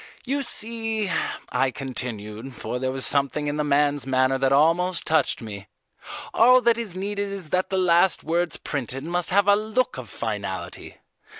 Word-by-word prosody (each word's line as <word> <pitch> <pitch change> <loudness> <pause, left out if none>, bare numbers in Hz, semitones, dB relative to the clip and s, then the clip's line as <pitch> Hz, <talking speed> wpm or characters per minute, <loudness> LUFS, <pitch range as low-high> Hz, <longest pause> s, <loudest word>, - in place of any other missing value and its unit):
You 280 +2 -1
see," 225 -4 +1 0.4
I 130 +1 +1
continued, 120 -1 -6
for 125 - -4
there 130 0 -1
was 130 0 -2
something 140 +1 +1
in 145 0 -2
the 150 - 0
man's 145 -1 +1
manner 130 0 +2
that 135 0 +1
almost 165 +5 +2
touched 155 -6 +1
me, 100 -3 -8 0.7
"all 250 +2 +6
that 235 -1 +3
is 210 -6 -3
needed 200 +1 -3
is 190 -5 -6
that 185 +2 0
the 190 - -1
last 180 0 +3
words 170 +1 -1
printed 135 -1 -4
must 175 +2 -1
have 200 +1 +3
a 205 - +6
look 220 +4 -1
of - - -9
finality. - - -5
160 Hz, 170 wpm, -24 LUFS, 135-200 Hz, 0.7 s, all